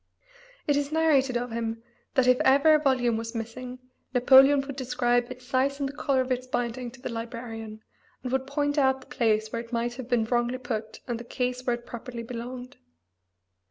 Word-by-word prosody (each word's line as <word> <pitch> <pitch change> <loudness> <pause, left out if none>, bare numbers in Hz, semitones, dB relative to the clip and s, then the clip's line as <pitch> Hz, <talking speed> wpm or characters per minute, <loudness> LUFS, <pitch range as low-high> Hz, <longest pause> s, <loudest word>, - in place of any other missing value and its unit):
It 290 - +2
is 285 0 -1
narrated 285 -6 +3
of 245 0 -4
him 225 0 -3 0.3
that 260 - +4
if 255 0 +5
ever 285 +4 +5
a 305 - +5
volume 250 -5 +2
was 230 +1 -5
missing 245 +3 -5 0.4
Napoleon 270 +3 +7
would 275 0 -7
describe 245 -2 +1
its 255 0 -10
size 270 +2 0
and 280 - 0
the 275 - -7
color 275 -2 +1
of 255 0 -3
its 255 0 -1
binding 245 0 -2
to 250 +2 -15
the - - -3
librarian, 225 -2 -6 0.4
and 250 - -4
would 265 0 0
point 290 +1 0
out 265 -1 +3
the 250 - -13
place 220 -2 +2
where 230 - -2
it 230 0 -13
might 240 0 -1
have 255 -2 -7
been 240 -3 +2
wrongly 240 +2 0
put 220 -4 -5
and 240 -2 -2
the - - -7
case 250 +1 -3
where 245 - +3
it 240 0 -12
properly 235 0 -7
belonged. 245 +2 -7
250 Hz, 200 wpm, -27 LUFS, 235-265 Hz, 0.4 s, Napoleon